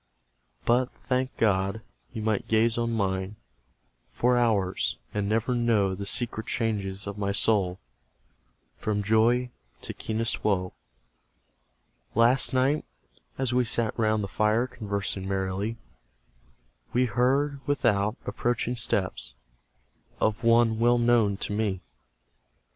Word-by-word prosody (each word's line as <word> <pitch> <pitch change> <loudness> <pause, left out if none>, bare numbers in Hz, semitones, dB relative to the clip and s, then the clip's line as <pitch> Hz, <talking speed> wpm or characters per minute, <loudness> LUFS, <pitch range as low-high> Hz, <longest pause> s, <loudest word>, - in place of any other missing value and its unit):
But, 125 +2 +3 0.2
thank 130 0 -1
God! 100 0 +1 0.3
you 110 -4 -5
might 110 -2 0
gaze 115 +1 +3
on 115 0 -1
mine 95 -2 -1 0.7
For 125 +1 +2
hours, 105 -6 +1 0.2
and 105 -1 -1
never 115 +3 +1
know 115 -5 +2
The 100 +2 -5
secret 115 -1 -1
changes 100 -4 -2
of 100 0 -6
my 100 -1 0
soul 100 -3 +1 1.0
From 105 -1 -1
joy 115 +4 +3 0.3
to - - -5
keenest 110 +1 -2
woe. 90 -3 0 1.4
Last 120 +6 +4
night, 135 +3 +2 0.5
as 130 -2 -1
we 125 0 +3
sat 115 -1 0
round 110 -2 +1
the - - -2
fire 110 +4 +1
Conversing 100 -5 -4
merrily, 95 +3 -2 1.2
We 125 +1 +3
heard, 135 +4 +1
without, 110 -6 +1
approaching 120 0 -1
steps 90 - -2 0.8
Of 110 +2 0
one 115 -1 +4
well 120 +1 +4
known 115 -4 +3
to 105 - -4
me! 105 -3 -1
110 Hz, 120 wpm, -27 LUFS, 100-120 Hz, 1.4 s, Last